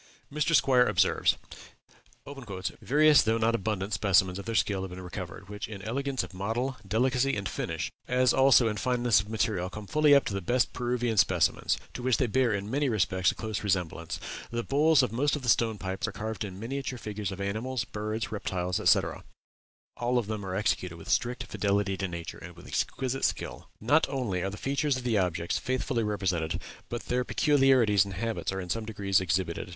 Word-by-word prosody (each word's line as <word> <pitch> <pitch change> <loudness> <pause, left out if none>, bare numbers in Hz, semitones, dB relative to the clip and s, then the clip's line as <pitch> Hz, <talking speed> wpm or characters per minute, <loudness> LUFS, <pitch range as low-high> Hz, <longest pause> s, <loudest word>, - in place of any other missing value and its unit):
Mr. 150 +2 +2
Squier 125 -2 +4
observes: 95 -2 +2 1.4
"Various 150 +1 +5
though 110 +1 +1
not 115 +1 +2
abundant 105 -2 -2
specimens 95 -2 +3
of 100 - -8
their 115 0 -3
skill 100 -3 +1
have 95 - -5
been 90 +1 -8
recovered, 90 +1 -7
which 105 0 -6
in 100 -3 -8
elegance 135 +4 -2
of - - -10
model, 115 +8 -2
delicacy, 125 +5 +1
and 100 -2 -3
finish, - - -3 0.2
as 125 0 +3
also 130 -3 +5
in 105 -1 -2
fineness 120 -1 +2
of 105 - -11
material, 105 -4 -1
come 105 +2 -8
fully 150 +5 +4
up 140 - +4
to - - -3
the 100 - -2
best 120 +7 +1
Peruvian 120 -2 -1
specimens, 90 -4 +2 0.2
to - - -6
which 130 -1 +2
they 130 - +2
bear, 125 +1 +2
in 100 -1 -2
many 140 +1 +1
respects, 95 -4 +2
a - - -11
close 110 -2 -4
resemblance. 90 -4 -2 0.3
The 120 0 -3
bowls 145 +1 +4
of 125 - -1
most 140 +6 +1
of 145 - -6
the 125 - -1
stone 110 -1 +3
pipes 95 -1 -3
are - - -4
carved 110 +1 -4
in 95 -2 -7
miniature 135 +3 -4
figures 105 -3 -4
of 95 - -7
animals, 110 +6 -2
birds, 110 +1 -4
reptiles, 90 -4 -2
etc. - - +2 0.7
All 120 +1 0
of 120 - +1
them 105 -1 -4
are 95 -1 -4
executed 95 -4 -1
with 80 - -11
strict 125 +1 0
fidelity 100 -1 0
to 95 - -2
nature, 85 -2 -7
and - - -10
with - - -14
exquisite 135 0 -2
skill. - - -2
Not 145 +9 +3
only 120 -10 -2
are 95 - -1
the 105 - -7
features 140 +1 0
of 130 - -6
the 115 -4 +2
objects 85 -2 -1
faithfully 130 -2 -1
represented, 95 -6 -1 0.3
but 120 - -4
their 125 +1 0
peculiarities 130 -8 +4
and 100 -2 -7
habits 115 +1 -2
are 95 - -3
in 90 -2 -5
some 115 +1 -2
degree 100 -3 -6
exhibited.... 90 -2 +1
110 Hz, 200 wpm, -28 LUFS, 95-125 Hz, 1.4 s, Various